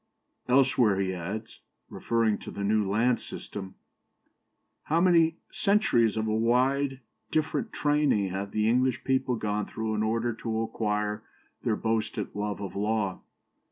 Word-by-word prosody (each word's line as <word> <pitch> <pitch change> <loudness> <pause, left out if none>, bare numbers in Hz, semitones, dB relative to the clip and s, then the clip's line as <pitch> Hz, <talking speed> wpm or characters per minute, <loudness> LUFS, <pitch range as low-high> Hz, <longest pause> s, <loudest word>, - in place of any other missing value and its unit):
" - - -45
Elsewhere 125 -6 +4
he 95 -1 0
adds, 100 +6 -6 0.3
referring 115 -3 0
to - - -9
the 100 - -5
land 110 +3 +2
system: 95 -3 -7 1.1
"How 160 +2 +2
many 170 -2 +4
centuries 165 - +2
of 110 - 0
a 110 - 0
widely 130 +4 +1 0.3
different 160 +8 -1
training 145 -9 +2
have 95 +2 -4
the 105 +1 0
English 125 +2 +2
people 130 -1 +1
gone 105 -2 -2
through 110 -1 -3
in 105 - 0
order 115 +2 0
to 110 0 -3
acquire 105 -1 -2 0.4
their 115 -4 +1
boasted 110 -1 -2
love 105 0 -3
of 100 - -6
law." 105 -2 -1
110 Hz, 140 wpm, -28 LUFS, 105-130 Hz, 1.1 s, Elsewhere